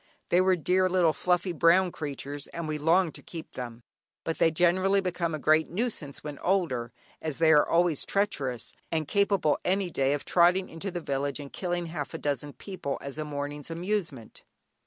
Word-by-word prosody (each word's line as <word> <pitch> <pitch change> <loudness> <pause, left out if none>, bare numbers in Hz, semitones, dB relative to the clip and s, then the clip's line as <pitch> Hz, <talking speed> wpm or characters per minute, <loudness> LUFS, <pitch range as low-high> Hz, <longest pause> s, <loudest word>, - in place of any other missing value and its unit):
They 175 - +5
were 185 0 +4
dear 185 +2 +2
little 175 -3 +3
fluffy 180 +4 +1
brown 175 +3 +4
creatures, 145 -1 -5
and 170 -1 -5
we 155 -1 -2
longed 165 +2 +3
to - - -8
keep 165 -2 -9
them, 120 -2 -7 0.4
but 165 - -3
they 165 - +5
generally 185 +4 +3
become 175 -3 -1
a - - -3
great 155 +2 +3
nuisance 180 - -3
when 145 -2 -6
older, 160 -11 0 0.3
as 155 -3 -3
they 160 -1 +5
are 150 -2 +5
always 170 -3 +2
treacherous, 135 - -1 0.2
and 160 -2 -1
capable 200 -6 +2
any 190 -1 0
day 135 -1 +1
of 145 - -3
trotting 180 +2 +4
into 165 +5 -5
the 175 -1 -4
village 140 -1 -2
and 140 -1 -9
killing 175 -2 -2
half 160 -4 -5
a - - -2
dozen 145 0 -2
people 180 -8 -5
as 140 +2 -7
a - - -1
morning's 145 0 -5
amusement. 170 - -3
165 Hz, 185 wpm, -28 LUFS, 145-180 Hz, 0.4 s, They